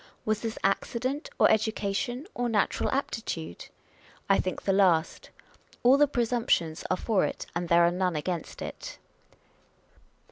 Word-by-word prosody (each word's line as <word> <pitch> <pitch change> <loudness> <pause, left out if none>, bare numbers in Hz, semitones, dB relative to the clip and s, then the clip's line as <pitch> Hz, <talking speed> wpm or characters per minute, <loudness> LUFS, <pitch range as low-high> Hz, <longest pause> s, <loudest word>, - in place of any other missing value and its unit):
Was 215 -1 0
this 225 -1 -4
accident, 255 - -1
or - - +6
education, 220 +4 -1
or 245 0 -1
natural 210 -3 +1
aptitude? 220 - -4 0.6
I 195 - +4
think 185 - -3
the 195 - +1
last. 180 -5 +2 0.5
All 250 +2 +7
the 295 +1 +5
presumptions 230 - 0
are 185 - +1
for 210 -2 +1
it, - - -3
and 170 0 -2
there 170 0 +5
are 170 - +4
none 180 -1 0
against 165 +2 -4
it. - - -7
200 Hz, 140 wpm, -28 LUFS, 175-240 Hz, 0.6 s, All